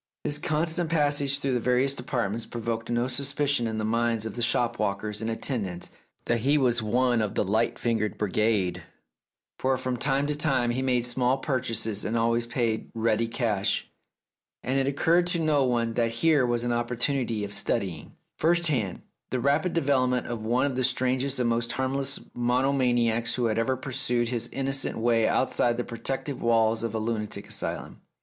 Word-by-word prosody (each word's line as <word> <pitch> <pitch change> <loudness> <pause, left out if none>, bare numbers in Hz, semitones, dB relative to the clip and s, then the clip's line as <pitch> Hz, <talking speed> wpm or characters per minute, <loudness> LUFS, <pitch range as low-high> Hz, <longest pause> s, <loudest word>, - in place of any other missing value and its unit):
His 150 0 0
constant 160 +1 0
pas 145 -3 +2
sage 140 -1 0
through 135 -2 -1
the 125 - +1
various 125 +3 +2
departments 120 -4 -2
provoked 115 -1 -4
no 120 +1 +1
suspicion 140 -2 0
in 110 -1 -3
the 110 - -1
minds 115 0 0
of 110 - -4
the 120 - -5
shop 120 0 +1
walkers 105 0 -2
and 110 - -2
atten 115 +2 -1
dants 90 -2 -6 0.3
that 120 0 +1
he 140 +6 +3
was 120 -4 +2
one 120 +2 +2
of 105 -2 -2
the - - +2
light 110 +4 +1
fingered 110 -4 -1
brigade, 105 -2 +1 0.8
for 130 0 +1
from 130 -1 -2
time 135 +2 +1
to 150 0 0
time 135 -5 +1
he 125 +2 -1
made 125 -2 +1
small 125 +1 +1
purchases 115 -6 -2
and 115 - -1
always 115 +1 +1
paid 120 -2 -1
ready 115 0 +1
cash, 110 -4 -1 0.7
and 130 +2 +1
it 135 - +1
occurred 165 +5 +2
to 175 -1 0
no 155 -3 +2
one 120 -2 0
that 115 0 +1
here 130 +3 +2
was 120 -1 0
an 120 0 0
opportunity 120 -1 -1
of 100 0 -4
studying, 90 -5 -2 0.2
first 170 +1 +3
hand, 110 - -1 0.3
the 130 - -1
rapid 145 +7 +2
development 130 -5 +1
of 120 -2 -5
one 120 +5 +2
of 140 -3 -1
the 130 - 0
strangest 130 +2 0
and 125 - +2
most 120 0 0
harmless 135 +1 -1
monomaniacs 120 -2 +1
who 125 - 0
had 110 -1 +1
ever 130 +3 +1
pursued 125 -3 -1
his 120 -1 -2
innocent 135 0 -1
way 115 -1 +2
outside 120 -2 +1
the 120 - -1
protective 130 +4 -4
walls 115 -1 +3
of 115 0 -3
a - - 0
lunatic 110 -1 -3
asylum. - - -5
120 Hz, 185 wpm, -27 LUFS, 115-135 Hz, 0.8 s, he